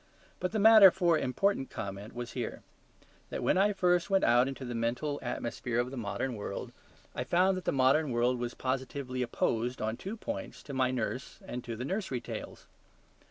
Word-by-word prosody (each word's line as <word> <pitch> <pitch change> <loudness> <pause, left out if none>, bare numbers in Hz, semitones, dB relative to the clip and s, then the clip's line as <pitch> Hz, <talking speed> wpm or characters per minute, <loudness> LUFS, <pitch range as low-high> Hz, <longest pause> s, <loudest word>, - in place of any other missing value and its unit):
But 180 - -1
the 220 - -1
matter 215 -2 +9
for 175 -2 +2
important 135 +2 0
comment 100 +3 -6
was 120 -1 -5
here: - - -5 0.7
that - - -4
when - - +3
I 200 +3 +4
first 180 -3 +2
went 195 -1 +3
out 120 +2 +5
into 135 -1 -5
the 120 - -4
mental 120 +6 -1
atmosphere 120 0 -3
of 125 +1 -1
the - - -6
modern 115 +2 -3
world, 100 -2 -5 0.4
I - - -2
found 185 +2 +3
that 185 - -6
the - - +2
modern 135 +3 +3
world 120 +1 +1
was 120 0 -3
positively 130 0 -3
opposed 120 0 -1
on 110 +1 -2
two 205 +4 -6
points 285 +4 -6
to 140 - -8
my 130 -1 +2
nurse 130 +1 -3
and 125 0 -5
to 115 - -4
the 125 +3 -5
nursery 185 - -2
tales. - - -8
130 Hz, 190 wpm, -31 LUFS, 120-180 Hz, 0.7 s, matter